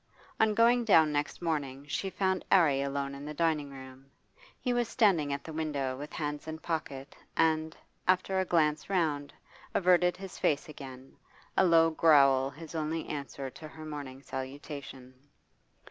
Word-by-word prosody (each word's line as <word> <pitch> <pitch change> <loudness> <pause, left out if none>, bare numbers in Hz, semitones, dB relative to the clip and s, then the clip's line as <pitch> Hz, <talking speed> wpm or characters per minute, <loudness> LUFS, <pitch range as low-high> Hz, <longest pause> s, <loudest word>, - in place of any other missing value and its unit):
On 220 -1 +3
going 235 +2 +4
down 160 -8 +5
next 145 +4 -2
morning 140 -4 -2
she 195 +6 -2
found 190 -1 0
'Arry 150 -7 +5
alone 140 0 -2
in 140 +1 -8
the 150 +1 -6
dining 155 -3 0
room; 135 0 -12 0.5
he 250 - -1
was 240 -1 +1
standing 180 - +3
at 140 0 -3
the 160 - -8
window 145 -4 -2
with 145 +3 -8
hands 150 0 -4
in 160 0 -4
pocket, 150 -4 -5 0.2
and, 160 0 +1 0.3
after 185 +1 +2
a 190 - +1
glance 155 -3 +1
round, 150 -7 0 0.4
averted 180 -1 +4
his 190 -1 -9
face 150 +3 +1
again, 135 -3 -11 0.4
a - - +4
low 165 -2 +5
growl 140 -5 +5
his 155 +3 -11
only 160 0 -2
answer 140 -2 -5
to 155 - -10
her 155 0 -11
morning 140 -3 -7
salutation. 135 -1 -7
150 Hz, 160 wpm, -30 LUFS, 140-170 Hz, 0.5 s, down